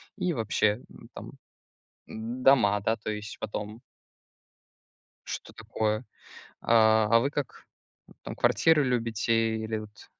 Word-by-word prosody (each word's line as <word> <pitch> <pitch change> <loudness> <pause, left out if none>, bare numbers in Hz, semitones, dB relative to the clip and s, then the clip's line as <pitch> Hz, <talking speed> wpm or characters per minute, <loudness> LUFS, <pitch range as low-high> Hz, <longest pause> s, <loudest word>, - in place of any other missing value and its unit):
и 180 -3 -1
вообще, 110 -3 0 0.3
там - - -9 0.7
дома, 115 -2 +2
да, 110 - +1
то 110 -1 -6
есть 105 0 -6
потом. 105 +2 -5 1.5
Что - - -7
такое? 110 +2 -2 0.6
А, 110 -1 +4
а 115 0 +6
вы 140 +3 0
как, 145 -3 -5 0.6
там - - -7
квартиры 160 -3 +3
любите, 115 -2 0
или 110 0 -3
вот 105 -1 -13
110 Hz, 110 wpm, -27 LUFS, 110-125 Hz, 1.5 s, а